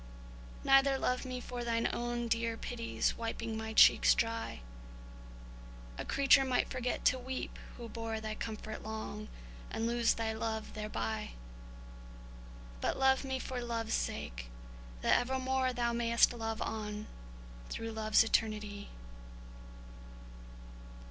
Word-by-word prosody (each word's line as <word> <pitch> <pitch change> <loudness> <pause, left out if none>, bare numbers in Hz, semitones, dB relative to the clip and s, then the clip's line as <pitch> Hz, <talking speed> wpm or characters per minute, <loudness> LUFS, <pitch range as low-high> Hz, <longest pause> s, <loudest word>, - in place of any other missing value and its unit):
Neither 270 0 +5
love 255 0 0
me 255 -1 -4
for 245 0 -5
Thine 230 -1 +1
own 240 0 -2
dear 230 0 0
pity's 230 -1 -1
wiping 225 -1 -3
my 220 0 -4
cheeks - - +7
dry,— 230 - -2 1.4
A - - -3
creature 275 0 +5
might 255 -2 +1
forget 250 -1 -2
to 255 - +4
weep, 260 +1 -5 0.2
who 235 - -7
bore 225 -1 -4
Thy 215 0 -4
comfort 220 0 -5
long, 215 -1 -5 0.4
and 225 - -2
lose 235 0 +2
thy 225 -1 -1
love 220 0 -3
thereby! 215 0 -3 1.5
But - - 0
love 265 0 +4
me 265 -1 -2
for 255 -1 -4
love's 230 -2 -2
sake, - - -3 0.5
that - - +5
evermore 260 +1 0
Thou 240 -1 0
may'st 235 0 +4
love 225 -2 -3
on, 210 -1 -4 0.6
through 225 0 -4
love's 215 -1 +4
eternity. 210 -2 -1
230 Hz, 120 wpm, -33 LUFS, 220-250 Hz, 1.5 s, cheeks